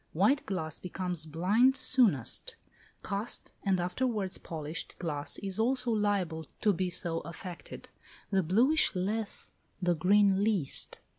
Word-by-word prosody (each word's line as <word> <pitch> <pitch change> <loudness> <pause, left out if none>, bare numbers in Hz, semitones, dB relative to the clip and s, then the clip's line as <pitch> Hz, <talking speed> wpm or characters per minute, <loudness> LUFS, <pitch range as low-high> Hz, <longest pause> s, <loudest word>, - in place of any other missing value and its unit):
White 210 - +2
glass 160 -5 -3
becomes 180 -3 -3
"blind" 205 - +3
soonest; 235 - +2 0.5
cast, 200 +3 -2
and 195 -3 +1
afterwards 195 +1 -1
polished 155 0 -5
glass 150 -4 -3
is 195 0 -5
also 250 +1 +1
liable 195 -7 0
to 210 - +3
be 185 0 -1
so 170 -2 0
affected; 170 +1 -9 0.4
the 195 -1 +3
bluish 235 - +3
less, 205 +3 -1 0.3
the 175 -2 +2
green 195 +3 +3
least. 200 -10 0
190 Hz, 125 wpm, -30 LUFS, 170-215 Hz, 0.5 s, blind